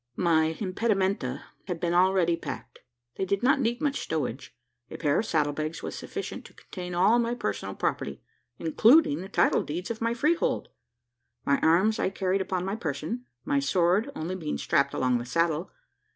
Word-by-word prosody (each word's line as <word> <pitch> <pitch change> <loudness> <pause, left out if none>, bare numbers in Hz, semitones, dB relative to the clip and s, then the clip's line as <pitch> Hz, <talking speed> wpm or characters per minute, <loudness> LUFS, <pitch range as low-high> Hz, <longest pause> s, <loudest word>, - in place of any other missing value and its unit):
My 160 -2 +2
impedimenta 195 - 0 0.2
had 175 -3 -3
been 170 0 0
already 180 -1 +3
packed. 165 - -8 0.4
They 190 - 0
did 200 +3 -1
not 275 +3 +4
need 240 0 0
much 285 -2 0
stowage. 140 -5 -4 0.3
A - - -7
pair 145 -3 +2
of 220 - -2
saddle 150 -2 +1
bags 155 +2 -4
was - - -4
sufficient - - -6
to - - -15
contain 180 -2 -7
all 200 +7 +4
my 235 0 0
personal 100 - -3
property 70 0 -2 0.4
including 175 - +4
the 190 - -8
title - - +3
deeds 175 +8 -4
of 225 - -6
my 230 +1 0
freehold! 310 +7 +1 0.8
My 140 - +3
arms 185 +7 +3
I - - +1
carried 190 0 0
upon 185 -1 -2
my 195 +2 -2
person: 165 - -4 0.2
my 140 - +2
sword 180 - +2
only 165 +4 -3
being 160 -5 -3
strapped 140 0 +1
along 125 -1 +1
the - - -4
saddle. 165 +4 0
180 Hz, 175 wpm, -27 LUFS, 155-210 Hz, 0.8 s, not